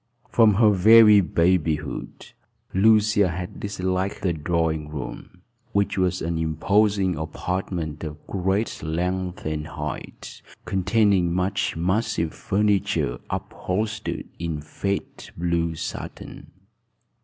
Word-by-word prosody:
From 110 Hz, -3 st, +5 dB
her 110 Hz, 0 st, +5 dB
very 105 Hz, +1 st, +7 dB
babyhood 85 Hz, -4 st, -1 dB, 0.4 s
Lucia 105 Hz, 0 st, +4 dB
had 90 Hz, +4 st, -6 dB
disliked 95 Hz, -1 st, -2 dB
the 90 Hz, -3 st, +1 dB
drawing 80 Hz, -1 st, -1 dB
room, 75 Hz, +4 st, -8 dB, 0.3 s
which 100 Hz, 0 st, +1 dB
was 90 Hz, -1 st, 0 dB
an 85 Hz, 0 st, -1 dB
imposing 95 Hz, +4 st, +2 dB
apartment 80 Hz, 0 st, -4 dB
of 75 Hz, -1 st, -5 dB
great 95 Hz, +3 st, -1 dB
length 90 Hz, +3 st, -2 dB
and 75 Hz, 0 st, -3 dB
height, -, -, -7 dB, 0.2 s
containing 95 Hz, -2 st, +2 dB
much 95 Hz, -1 st, -1 dB
massive 90 Hz, -2 st, 0 dB
furniture, 100 Hz, -11 st, 0 dB
upholstered 105 Hz, +3 st, -3 dB
in 85 Hz, -3 st, -3 dB
faded 100 Hz, +6 st, -4 dB
blue 85 Hz, -1 st, 0 dB
satin. -, -, -7 dB
90 Hz, 100 wpm, -24 LUFS, 80-100 Hz, 0.4 s, very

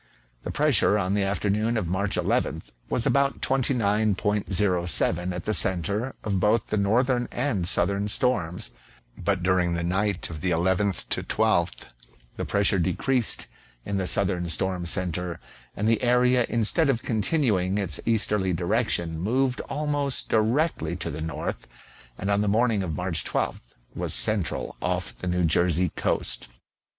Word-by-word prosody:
The -, -, -6 dB
pressure 145 Hz, -8 st, +3 dB
on 95 Hz, -1 st, 0 dB
the 105 Hz, -, +1 dB
afternoon 105 Hz, +3 st, 0 dB
of 100 Hz, -6 st, -1 dB
March 95 Hz, +3 st, -1 dB
1 -, -, -1 dB
1th -, -, -1 dB, 0.2 s
was 120 Hz, -, 0 dB
about 140 Hz, 0 st, +2 dB
29.07 105 Hz, -, +1 dB
at 90 Hz, -1 st, -5 dB
the 110 Hz, -, 0 dB
centre 100 Hz, +7 st, -1 dB
of 100 Hz, -3 st, -1 dB
both 105 Hz, +4 st, +2 dB
the 105 Hz, -, -2 dB
northern 120 Hz, +4 st, +2 dB
and 120 Hz, -9 st, -1 dB
southern 100 Hz, +3 st, +1 dB
storms, 100 Hz, -7 st, -1 dB, 0.4 s
but 95 Hz, -1 st, -1 dB
during 90 Hz, -2 st, +2 dB
the 85 Hz, -, -2 dB
night 95 Hz, +2 st, 0 dB
of 75 Hz, -2 st, -6 dB
the 90 Hz, -, +1 dB
11 95 Hz, +4 st, +2 dB
12th -, -, 0 dB, 0.5 s
the -, -, -4 dB
pressure 100 Hz, -1 st, +3 dB
decreased 115 Hz, +7 st, 0 dB, 0.4 s
in 100 Hz, -, -2 dB
the 95 Hz, -1 st, -1 dB
southern 90 Hz, -4 st, 0 dB
storm 90 Hz, 0 st, -1 dB
centre, 90 Hz, -1 st, -1 dB, 0.4 s
and 105 Hz, -, 0 dB
the 115 Hz, -1 st, +2 dB
area 125 Hz, 0 st, +3 dB
instead 120 Hz, +8 st, +2 dB
of 120 Hz, -4 st, 0 dB
continuing 105 Hz, -, +1 dB
its 95 Hz, -6 st, -2 dB
easterly 105 Hz, -4 st, +1 dB
direction 85 Hz, -3 st, 0 dB
moved 125 Hz, +7 st, 0 dB
almost 145 Hz, -1 st, -2 dB
directly 110 Hz, -, +1 dB
to 90 Hz, -, -4 dB
the 75 Hz, +2 st, -6 dB
north, 80 Hz, +1 st, -4 dB, 0.5 s
and 100 Hz, +2 st, -2 dB
on 100 Hz, 0 st, +2 dB
the 105 Hz, -, 0 dB
morning 110 Hz, 0 st, +2 dB
of 85 Hz, -5 st, -3 dB
March 90 Hz, -3 st, -1 dB
12th -, -, -3 dB, 0.2 s
was -, -, -2 dB
central 85 Hz, -, +1 dB
off -, -, -2 dB
the 90 Hz, -, -7 dB
New 90 Hz, 0 st, +1 dB
Jersey 85 Hz, +2 st, +2 dB
coast. -, -, -1 dB
100 Hz, 150 wpm, -25 LUFS, 90-115 Hz, 0.5 s, pressure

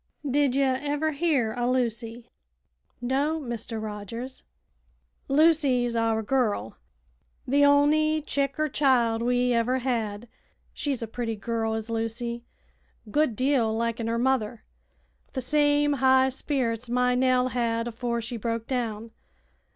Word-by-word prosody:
Did 275 Hz, -1 st, +2 dB
ye 275 Hz, -, +3 dB
ever 285 Hz, +4 st, 0 dB
hear 280 Hz, -7 st, +1 dB
o' 245 Hz, 0 st, 0 dB
Lucy?" 235 Hz, -1 st, -2 dB, 0.7 s
"No, 280 Hz, +6 st, 0 dB
Mr. 235 Hz, -4 st, -5 dB
Rogers." 220 Hz, +4 st, -6 dB, 0.9 s
"Lucy's 275 Hz, -5 st, +3 dB
our 225 Hz, -1 st, +1 dB
girl 210 Hz, -, 0 dB, 0.7 s
the 285 Hz, +3 st, +3 dB
on'y 305 Hz, +2 st, +3 dB
chick 275 Hz, -2 st, -1 dB
er 310 Hz, -, +2 dB
child 250 Hz, -6 st, +2 dB
we 245 Hz, +1 st, +2 dB
ever 235 Hz, +2 st, +1 dB
had. 235 Hz, -4 st, -2 dB, 0.5 s
She's 275 Hz, -5 st, -2 dB
a -, -, -4 dB
pretty 225 Hz, 0 st, -3 dB
girl, 225 Hz, +1 st, -2 dB
is 220 Hz, +1 st, -5 dB
Lucy; 230 Hz, +1 st, -3 dB, 0.6 s
a -, -, -14 dB
good 295 Hz, -4 st, +2 dB
deal 250 Hz, -3 st, +1 dB
liken 230 Hz, 0 st, -2 dB
her 230 Hz, 0 st, 0 dB
mother; 235 Hz, -3 st, 0 dB, 0.6 s
wi' -, -, -36 dB
the 260 Hz, -, -2 dB
same 290 Hz, +2 st, +2 dB
high 265 Hz, -1 st, +4 dB
spirits 250 Hz, -3 st, -2 dB
my 250 Hz, +1 st, +2 dB
Nell 255 Hz, 0 st, +2 dB
had 230 Hz, -1 st, -1 dB
afore 235 Hz, 0 st, -3 dB
she 235 Hz, +1 st, -4 dB
broke 230 Hz, +1 st, -3 dB
down. 230 Hz, -3 st, -3 dB
245 Hz, 135 wpm, -26 LUFS, 230-275 Hz, 0.9 s, high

